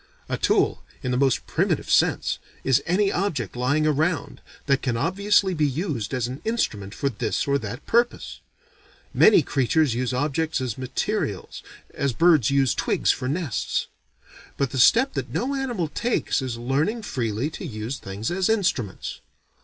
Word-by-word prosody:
A - - -1
tool, - - +1 0.2
in 125 - -1
the - - +1
most 135 0 +2
primitive - - 0
sense, - - +2 0.2
is 130 -2 +3
any 195 +3 +2
object, 150 - -2
lying 140 +5 +1
around, 155 +2 0 0.2
that 135 -2 +2
can 120 -4 -1
obviously 190 - +2
be 155 -3 +2
used 140 - -3
as 125 -3 -1
an 130 +3 -7
instrument 105 - -2
for 140 - -1
this 120 +1 -2
or 140 0 +2
that 115 +3 -7
purpose. 240 +1 0 0.7
Many 210 -7 +6
creatures 135 +1 +1
use 125 +1 -1
objects 150 +4 -1
as 125 -4 -3
materials, 130 -1 -3 0.3
as 140 -2 -1
birds 160 -6 +4
use 135 -3 +3
twigs - - +1
for 125 - -3
nests. 145 - -1 0.7
But 135 -2 0
the 135 - -2
step 235 - +5
that - - -3
no 265 +3 -1
animal 245 - -2
takes 230 - -1
is 125 -3 -4
learning 145 - -1
freely 120 - -2
to 160 - -8
use 120 -3 -5
things 100 - -4
as 185 +2 0
instruments. 180 - -1
140 Hz, 160 wpm, -24 LUFS, 125-180 Hz, 0.7 s, Many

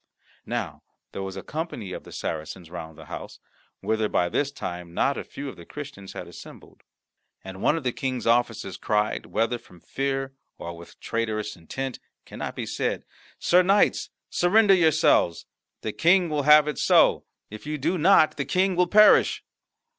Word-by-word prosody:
Now - - -4 0.3
there - - -6
was 95 -1 -5
a - - -6
company 150 - -5
of - - -8
the - - -12
Saracens 80 +2 -6
round 80 -3 -8
the - - -12
house, - - -8 0.4
whither 110 -1 0
by 90 - +1
this 140 +7 0
time 90 -8 -7
not 140 - +2
a - - -5
few 140 - -8
of 135 - -8
the 85 - -11
Christians 135 - -9
had - - -7
assembled. - - -13 0.6
And 95 0 -9
one 160 - +3
of 160 - -5
the 125 - 0
King's 130 0 -3
officers 115 -5 +1
cried 105 0 -1
whether 115 +2 0
from 90 - -18
fear 135 +4 -3 0.2
or 85 0 -7
with 85 0 -14
traitorous 110 -2 -3
intent 130 +10 -6 0.3
cannot - - -6
be - - -4
said - - -2 0.3
"Sir 180 +1 +4
knights, 195 +3 +2 0.2
surrender 200 +3 +4
yourselves! 155 - +3 0.4
The 110 - -4
King 175 +1 +3
will 150 -2 -1
have 150 0 +8
it 150 - -3
so; - - +4 0.3
if 110 +6 -9
you 155 0 -2
do 165 +6 -1
not, 160 -1 +5
the 140 - -2
King 185 +5 +1
will 180 0 +3
perish." 210 +3 +5
135 Hz, 175 wpm, -25 LUFS, 95-160 Hz, 0.6 s, have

